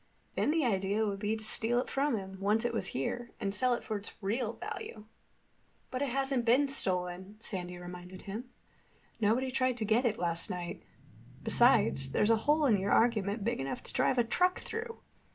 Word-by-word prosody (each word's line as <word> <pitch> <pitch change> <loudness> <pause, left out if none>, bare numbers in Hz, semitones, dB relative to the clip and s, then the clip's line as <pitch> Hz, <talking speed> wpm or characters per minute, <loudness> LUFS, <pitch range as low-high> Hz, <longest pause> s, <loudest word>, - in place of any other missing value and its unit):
Then - - +1
the 315 -2 +2
idea 200 0 +1
would 200 -2 -2
be 210 +2 -1
to 220 - -10
steal 225 +2 +3
it 250 - -2
from 275 -3 +1
him, 190 -1 -7
once 210 +4 +1
it 240 - 0
was 225 - -2
here, 235 - -3
and 195 0 -2
sell 250 +3 +3
it - - -7
for 215 - -2
its 205 - -7
real 220 +3 -1
value." 215 -1 -7 0.9
"But 255 +1 -3
it 285 - 0
hasn't 270 -1 0
been 250 +5 +4
stolen," 185 -4 -1
Sandy 180 -5 -4
reminded 180 +1 -9
him. 215 +5 -5 0.7
"Nobody 235 +5 +2
tried 255 -1 +1
to 220 - -1
get 225 +4 +2
it 220 -2 +1
last 170 +1 0
night. 180 -2 -5 0.6
Besides, 135 0 +3
there's 210 - +3
a - - +6
hole 300 0 +4
in 220 -7 +4
your 195 +2 -1
argument 215 -3 +2
big 230 +3 -1
enough 135 0 -4
to - - -8
drive 255 - +2
a 240 - +5
truck 360 +10 +1
through. 455 +1 -6
220 Hz, 195 wpm, -32 LUFS, 195-250 Hz, 0.9 s, a